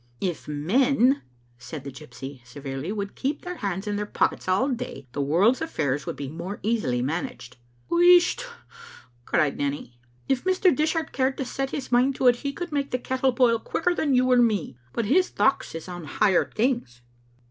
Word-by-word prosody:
" - - -35
"If - - -18
men," 245 - +2 0.4
said 140 +2 -8
the 140 - -7
gypsy, 135 -2 -10
severely, 135 +5 -6
"would 200 -2 -4
keep 280 +3 -3
their 360 0 -5
hands 195 - -3
in 205 -1 -2
their 210 0 -3
pockets - - 0
all 190 +8 +2
day, 250 - -5
the 145 - -3
world's 180 - +3
affairs 145 - -2
would - - -3
be 140 - -5
more 170 +7 -6
easily 190 - 0
managed." 150 - -4 0.3
"Wheesht!" 355 +6 +5 0.8
cried 150 -2 +1
Nanny, 140 -4 -3 0.3
"if 265 -2 0
Mr. 370 0 +3
Dishart 315 +1 0
cared 265 0 0
to 270 - -2
set 270 +2 -3
his 270 -2 -5
mind 255 +3 +3
to 260 - -2
it, 245 -1 +6
he 280 +3 -3
could 345 +4 -6
make 280 -1 -1
the 250 - 0
kettle 260 +1 0
boil 235 -2 +3
quicker 350 +9 0
than 290 -6 +1
you 255 0 +3
or 250 - +6
me. 215 - +2 0.2
But 230 - -2
his 360 - +3
thochts 270 -10 +1
is 165 - -7
on 175 -2 -7
higher 190 +5 +2
things. 220 - -1
230 Hz, 190 wpm, -25 LUFS, -, 0.8 s, it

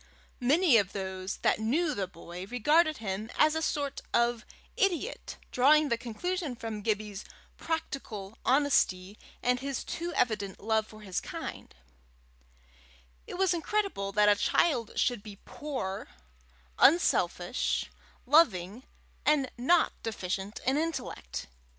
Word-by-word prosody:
Many 285 +2 +5
of 200 -3 +1
those 190 -1 -4
that - - +3
knew 295 +9 +1
the 195 -7 -2
boy, 175 +1 -9
regarded 305 +8 +3
him 210 0 -4
as 305 0 +5
a 320 - -1
sort 285 -3 -2
of 235 -1 +1 0.3
idiot, 395 +4 -1
drawing 295 +4 +5
the 235 - +3
conclusion 300 +5 -3
from 225 -2 -5
Gibbie's 210 -1 -2 0.3
practical 230 -11 -4
honesty 215 -9 +2 0.2
and 250 0 +2
his 275 0 -3
too 345 +1 -4
evident 210 -5 0
love 220 0 0
for 215 0 -13
his 190 -3 -3
kind: - - -7 1.5
it - - -6
was 380 -1 +3
incredible 345 - -1
that 210 +1 +4
a 205 - +6
child 240 0 +1
should 245 -4 +1
be 205 -1 -10
poor, 260 -11 -5 0.7
unselfish, 340 +4 +2 0.3
loving, 230 - +3 0.4
and 290 -3 +2
not 325 +8 +3
deficient 195 -1 -4
in 265 +2 +2
intellect! 300 - -3
240 Hz, 125 wpm, -30 LUFS, 205-300 Hz, 1.5 s, a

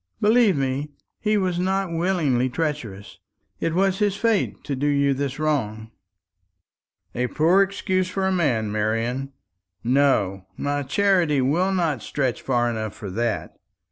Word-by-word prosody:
Believe 215 -4 +4
me, 135 +2 -2 0.3
he 215 -1 +1
was 185 -3 0
not 190 0 0
willingly 165 -8 +1
treacherous; 125 -10 -4 0.4
it 165 0 -1
was 190 0 +2
his 205 -2 +1
fate 225 0 0
to 140 - -3
do 140 +3 -1
you 140 -1 +2
this 135 0 -3
wrong." 115 -8 -2 1.2
"A 125 +1 -1
poor 165 +8 +3
excuse 190 -1 0
for 190 +1 -1
a 190 - +2
man, 125 - +1
Marian. 115 +6 -1 0.5
No, 115 -8 +2
my 145 0 -1
charity 170 0 +2
will 165 +9 +2
not 165 - 0
stretch 130 -4 -2
far 120 -2 +1
enough 110 -3 -3
for 100 -3 -7
that. 115 +2 -2
145 Hz, 140 wpm, -23 LUFS, 125-185 Hz, 1.2 s, Believe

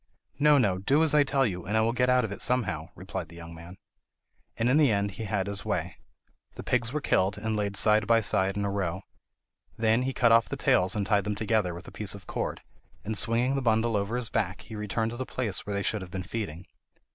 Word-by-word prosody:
"No, 150 0 +6
no; 100 -8 +2
do 140 +11 +3
as 155 -3 +2
I 150 -1 +6
tell 135 -1 +1
you, 90 -5 -3
and 105 +6 -1
I - - +4
will 115 +1 +1
get 125 +1 +2
out 125 -2 +4
of 105 - -6
it 100 - -4
somehow," 95 -11 0
replied 90 -3 -6
the 85 - -13
young 85 0 -10
man. 85 +3 -11 0.8
And 115 - +1
in 130 +4 +4
the 150 -4 +5
end 100 0 0
he 110 +4 -6
had 100 -2 -1
his 100 -1 -5
way. - - -3 0.6
The - - -7
pigs 120 -2 0
were 150 +2 -2
killed, 100 -5 +1
and 110 +1 -2
laid 100 -1 -1
side 105 0 +3
by 115 0 +5
side 95 -1 +1
in 100 - -1
a 100 - -1
row. 95 -2 -2 0.7
Then 115 +1 +2
he 130 +1 -1
cut 120 -3 +3
off 115 0 +5
the - - -4
tails 90 +1 +2
and 105 -2 -1
tied 100 -1 +2
them 105 0 -1
together 105 -4 0
with 85 - -10
a - - -9
piece 105 -2 -4
of 100 - -12
cord, - - -4 0.4
and 110 +1 -2
swinging 120 +4 +1
the 135 - 0
bundle 115 -1 +2
over 100 +3 -1
his 125 -3 -4
back, 100 -2 -1
he 110 - -10
returned 105 +2 -2
to 120 - -7
the 130 - -2
place 110 -8 -3
where 100 - -2
they 100 - -1
should 105 0 0
have 95 - -8
been 95 +1 -5
feeding. 90 -2 -5
105 Hz, 250 wpm, -28 LUFS, 95-115 Hz, 0.8 s, No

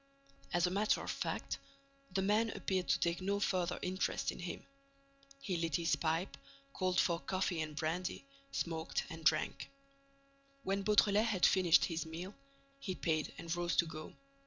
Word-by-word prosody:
As 175 0 +3
a 180 - 0
matter 205 +3 +2
of - - -2
fact, - - -3 0.5
the 190 +1 0
man 215 +3 +3
appeared 185 -4 -1
to - - +3
take 170 +1 0
no 200 +2 0
further 185 -4 +1
interest 185 +1 0
in - - -9
him. 175 -1 -5 0.7
He 190 -9 -2
lit 165 -3 0
his 170 -1 +2
pipe, 165 +3 -1 0.4
called 185 -1 +1
for 170 -2 +3
coffee 185 -2 -1
and 155 -1 -4
brandy, 170 - -2 0.3
smoked 160 -1 -2
and 165 0 -7
drank. 155 0 +2 0.9
When 195 -1 0
Beautrelet 210 +1 +4
had 195 -5 +3
finished 180 -4 +5
his 165 -1 -3
meal, 175 +5 -6 0.5
he 190 -8 -3
paid 155 -4 0
and 165 0 -3
rose 175 0 0
to 170 - +4
go. 155 -1 -8
180 Hz, 160 wpm, -35 LUFS, 165-195 Hz, 0.9 s, finished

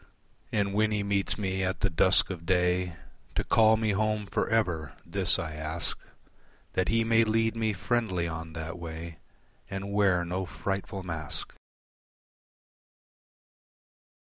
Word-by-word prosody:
And 100 -2 +1
when 110 +1 +3
he 105 -1 0
meets 100 0 0
me 95 -2 -1
at 95 +1 -1
the - - +3
dusk 95 +4 +4
of 85 -3 -6
day 90 0 +1 0.4
To - - +1
call 110 -1 +5
me 110 -1 +1
home 105 +1 0
for - - -1
ever, 85 - 0
this - - +2
I 80 - -4
ask 80 +2 -2 0.8
That 95 - +1
he 115 0 +3
may 115 0 +4
lead 115 +1 +1
me 110 -1 +1
friendly 95 -4 0
on 80 0 -6
that 80 +2 -5
way 80 -1 -7 0.5
And 100 +1 -4
wear 95 -4 +3
no 90 +2 -2
frightful 95 +1 -4
mask. 80 -4 -4
95 Hz, 140 wpm, -29 LUFS, 85-105 Hz, 0.8 s, call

